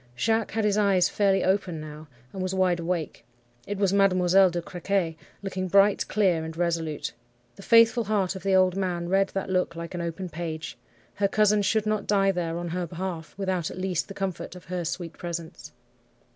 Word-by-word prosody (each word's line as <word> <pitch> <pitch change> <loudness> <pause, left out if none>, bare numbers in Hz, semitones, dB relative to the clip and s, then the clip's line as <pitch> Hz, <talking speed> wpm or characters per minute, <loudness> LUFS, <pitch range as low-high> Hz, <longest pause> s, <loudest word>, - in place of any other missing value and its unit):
Jacques 225 - 0
had 220 -1 0
his 210 0 +2
eyes 195 -3 +3
fairly 195 -2 +2
open 185 -3 0
now, 155 0 -9 0.3
and 190 - -5
was 185 +1 -2
wide 185 -2 +2
awake. 170 -2 -3 0.4
It 205 - -3
was 195 -1 +1
Mademoiselle 190 -1 +4
de 175 0 -2
Crequy, 175 -1 -2 0.3
looking 190 -1 -3
bright, 200 +2 +4
clear, 185 -6 +2
and 160 0 -7
resolute. 165 -3 -2 0.4
The - - -12
faithful 230 +2 +5
heart 195 -3 0
of 190 - -7
the 195 -1 +2
old 185 -1 +4
man 175 -3 -2
read 195 +1 +3
that 195 -1 -2
look 180 -2 0
like 170 +1 -6
an 175 - -3
open 170 +2 -4
page. 160 -1 -5 0.4
Her 200 - +1
cousin 210 +1 +3
should 215 +1 +1
not 215 -1 -1
die 195 -1 +3
there 170 -2 -2
on 175 0 -4
her 175 +1 -3
behalf, 170 -1 -6
without 190 -4 -1
at - - -9
least 185 -2 -1
the 195 - -9
comfort 190 -2 -4
of 180 - -12
her 180 -1 -3
sweet 170 0 -4
presence. 170 -1 -7
185 Hz, 195 wpm, -26 LUFS, 170-195 Hz, 0.4 s, faithful